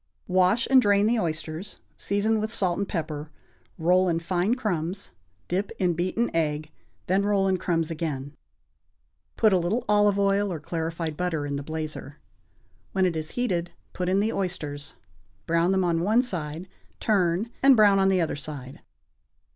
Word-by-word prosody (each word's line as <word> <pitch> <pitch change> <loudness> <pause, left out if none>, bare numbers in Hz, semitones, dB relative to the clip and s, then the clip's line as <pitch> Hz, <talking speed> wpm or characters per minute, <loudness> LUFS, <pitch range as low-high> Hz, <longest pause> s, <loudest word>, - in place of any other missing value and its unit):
= - - -46
Wash 185 +6 +3
and 260 -1 +8
drain 205 -2 +3
the 230 +1 +2
oysters, 160 +2 -4 0.2
season 210 +2 0
with 215 +1 -2
salt 185 -6 0
and 200 - -2
pepper, 155 -3 -4 0.5
roll 180 +3 +3
in 165 -1 +1
fine 180 +6 0
crumbs, 190 -5 -3 0.4
dip 190 +3 -1
in 180 -2 +1
beaten 185 +6 -1
egg, 155 -1 -1 0.3
then 190 +2 +2
roll 200 -1 +2
in 190 -1 +2
crumbs 165 -2 -1
again. 150 -3 -4 1.0
Put 215 -3 +4
a 185 - +4
little 185 +8 -1
olive 205 -1 +4
oil 200 0 +2
or 165 - -4
clarified 165 0 -3
butter 165 -3 -2
in 140 0 -3
the 140 - -3
blazer; 155 -1 -6 0.8
when 190 -1 +2
it 175 -3 0
is 155 -1 -4
heated, 180 -9 -1 0.2
put 180 -1 -2
in 195 +2 +3
the 220 +2 0
oysters, 150 -6 -4 0.5
brown 170 +2 +2
them 190 -1 +2
on 170 -2 +1
one 220 +7 +3
side, 170 -5 -4 0.3
turn, 195 +1 +1
and 270 -1 +7
brown 205 -2 +6
on 195 - +4
the 190 -2 +3
other 165 - -1
side. 140 -3 -8
180 Hz, 170 wpm, -26 LUFS, 160-200 Hz, 1.0 s, and